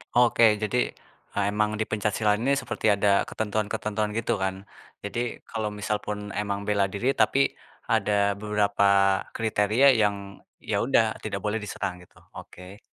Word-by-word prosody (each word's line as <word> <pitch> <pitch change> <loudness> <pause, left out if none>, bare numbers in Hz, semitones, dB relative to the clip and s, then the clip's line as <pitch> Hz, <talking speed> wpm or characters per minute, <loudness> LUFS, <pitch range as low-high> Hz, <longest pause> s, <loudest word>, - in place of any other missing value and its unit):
Oke 120 -1 +4 0.2
jadi, 105 +3 -1 0.6
eee, 100 - 0
emang 105 0 +1
di 110 - 0
pencak 105 -1 -1
silat 105 -2 +2
ini 135 +3 +2
seperti 130 - -5
ada 100 0 +2
ketentuan-ketentuan 105 0 -2
gitu 115 - 0
kan. 95 +1 -3 0.4
Jadi 100 +4 -4 0.3
kalau 110 -2 -2
misal 105 +1 -1
pun 105 0 -5
emang 100 -1 -3
bela 100 -1 +2
diri, 120 +8 0
tapi 140 0 +3 0.4
ada 100 -2 +2
beberapa 105 -1 +1 0.5
kriteria 110 +3 +2
yang, 105 -1 +2 0.5
ya - - -1
udah 120 -3 +4 0.2
tidak 100 -2 -3
boleh 105 +1 0
diserang 100 -3 -4
gitu. 90 - -20 0.2
Oke. 90 +3 -11
105 Hz, 150 wpm, -26 LUFS, 100-110 Hz, 0.6 s, Oke